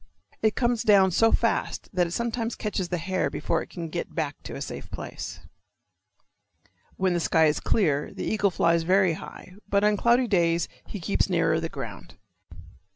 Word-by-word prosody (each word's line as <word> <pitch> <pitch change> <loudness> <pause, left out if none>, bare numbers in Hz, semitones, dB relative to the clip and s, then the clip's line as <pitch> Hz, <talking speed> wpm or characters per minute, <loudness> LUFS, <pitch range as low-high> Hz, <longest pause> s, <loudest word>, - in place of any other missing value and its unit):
It 220 -1 +2
comes 240 -2 +1
down 200 -5 +5
so 225 +6 +4
fast 230 -1 0
that 180 -2 +2
it - - -8
sometimes 235 +2 -2
catches 195 -4 -3
the 180 - -1
hare 185 +2 -1
before - - -1
it - - -9
can 170 -2 -6
get 170 +2 -5
back 150 -4 -2
to - - -8
a - - -6
safe - - -7
place. - - -7 1.6
When 185 -1 +1
the 175 - +1
sky 160 -1 +3
is 150 -1 +2
clear 150 -9 +1
the - - -6
eagle 210 -2 +2
flies 170 -2 +2
very 185 +1 +3
high, 180 +3 -10 0.2
but 200 0 +2
on 210 0 +3
cloudy 240 +4 +3
days 170 -4 +2 0.2
he 205 - -6
keeps 195 +3 0
nearer 165 -3 +2
the 165 0 -3
ground. 100 - -8
185 Hz, 180 wpm, -26 LUFS, 165-210 Hz, 1.6 s, down